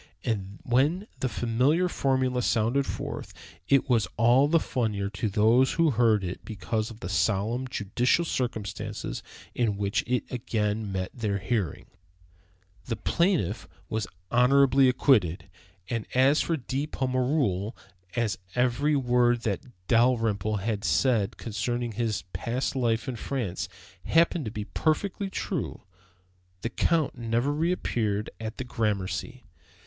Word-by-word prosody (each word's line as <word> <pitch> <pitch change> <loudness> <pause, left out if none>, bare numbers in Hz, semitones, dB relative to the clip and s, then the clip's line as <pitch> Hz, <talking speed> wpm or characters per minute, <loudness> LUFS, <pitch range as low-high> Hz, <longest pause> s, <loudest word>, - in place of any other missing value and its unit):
And 100 -3 -2
when 145 +11 +2
the 130 - 0
familiar 130 +11 +2
formula 130 -5 +1
sounded 120 +4 +1
forth, - - -5 0.3
it 140 0 +4
was 115 -7 +2
all 120 +5 +5
the 165 +2 +4
funnier 105 -8 -1
to 105 +1 -2
those 115 +6 +4
who 165 -2 +3
heard 110 -4 +3
it 90 0 -5
because 110 +1 -3
of 115 0 -12
the - - -4
solemn, 110 +6 0
judicial 125 - +1
circumstances 120 -8 -3 0.3
in 110 -5 0
which 100 +1 0
it 125 0 +1
again 110 -3 -1
met 95 -1 -3
their 105 -5 -1
hearing. 95 - -2 1.0
The 115 - -1
plaintiff 160 - 0 0.2
was 110 -3 -2 0.2
honorably 135 +2 +5
acquitted. 100 - +2 0.6
As 135 +4 +5
for 165 - 0
De 135 +2 -3
Pommereul, 130 - 0 0.4
as 115 -5 0 0.2
every 125 +4 +2
word 120 -2 +3
that 105 +1 -2 0.2
Dalrymple 115 -3 +2
had 105 -1 -2
said 100 - +2
concerning 120 +2 -2
his 110 -2 -2
past 115 +9 -2
life 115 -3 0
in 125 -2 -3
France 115 -7 -3 0.4
happened 165 -2 +3
to 110 - -4
be 105 -1 -5
perfectly 195 - -1
true, 185 - -3 0.8
the 115 - -2
Count 155 -4 +1
never 120 +4 0
reappeared 120 - -1
at 110 0 -5
the - - -3
Gramercy. 110 +2 -2
120 Hz, 130 wpm, -27 LUFS, 105-130 Hz, 1.0 s, all